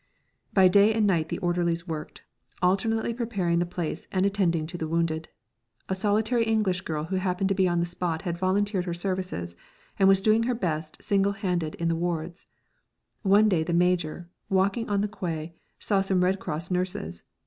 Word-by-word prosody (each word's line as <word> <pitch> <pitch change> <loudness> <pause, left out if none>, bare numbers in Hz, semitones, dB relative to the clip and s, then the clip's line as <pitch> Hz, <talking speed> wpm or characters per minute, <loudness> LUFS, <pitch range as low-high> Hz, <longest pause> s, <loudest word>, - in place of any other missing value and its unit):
By 190 -2 +6
day 200 +4 +5
and 220 -2 +2
night 170 -5 +1
the - - -2
orderlies 175 0 0
worked, 155 -2 -6 0.4
alternately 220 +6 +1
preparing 200 -8 0
the 175 - 0
place 175 -2 -4
and 190 0 +1
attending 180 -5 +1
to 175 +3 -8
the 160 -2 -3
wounded. 160 -1 -1 0.6
A - - +1
solitary 215 +5 +1
English 215 -5 +1
girl 155 -4 -3
who 185 +4 -2
happened 185 +1 0
to - - +3
be 190 -1 +3
on 175 -1 +1
the 170 - +1
spot 175 -2 -3
had 175 -3 -2
volunteered 190 +1 0
her 175 -2 -3
services, 180 - -3 0.4
and 195 - +5
was 195 -1 +6
doing 215 +2 +4
her 250 - +1
best 160 -7 -3
single 200 0 +2
handed 180 -6 -2
in 170 - -2
the 165 - +1
wards. 170 0 -3 0.7
One 205 +1 +5
day 180 -6 +2
the 170 +2 -2
Major, 175 -1 +1 0.2
walking 195 +4 +1
on 200 -1 +1
the 210 - 0
quay, 170 -6 -5 0.2
saw 200 -2 +1
some 190 -2 +1
Red 190 +2 +1
Cross 165 +2 -4
nurses. 180 - -2
180 Hz, 185 wpm, -26 LUFS, 170-200 Hz, 0.7 s, By